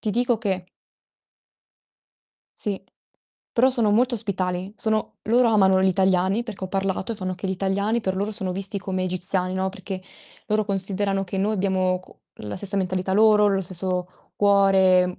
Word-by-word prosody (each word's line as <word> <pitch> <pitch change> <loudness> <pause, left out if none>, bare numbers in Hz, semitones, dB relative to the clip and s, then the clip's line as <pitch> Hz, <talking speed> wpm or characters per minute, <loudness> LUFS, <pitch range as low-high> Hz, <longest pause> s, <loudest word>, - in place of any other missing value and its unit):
ti 215 - -2
dico 240 +1 +1
che 190 -4 -2 1.9
Sì, 200 -2 -2 0.7
però 250 +3 +4
sono 235 -5 +1
molto 240 +4 +3
ospitali, 185 -2 -2
sono 220 -1 0
loro 240 +2 +3
amano 190 -4 +4
gli - - +3
italiani, 190 +3 +2
perché 220 -5 -7
ho - - -5
parlato, 195 +2 -2
e - - -5
fanno 185 -3 -4
che 185 +2 -6
gli - - -1
italiani 200 +4 0
per 190 -3 -2
loro 205 +3 -2
sono 190 -2 +1
visti 195 +2 -4
come 185 -1 -3
egiziani, 185 0 -1
no, 190 0 -1
perché 190 -1 -7 0.4
loro 215 0 +1
considerano 195 0 -1
che 190 +1 -6
noi 200 +3 +1
abbiamo 185 -2 0
co 185 - -20 0.2
la 105 -1 -5
stessa 200 +1 -1
mentalità 185 0 -1
loro, 210 0 +5
lo 195 -1 +1
stesso 185 0 -3
cuore 190 -3 +4
195 Hz, 165 wpm, -23 LUFS, 185-210 Hz, 1.9 s, loro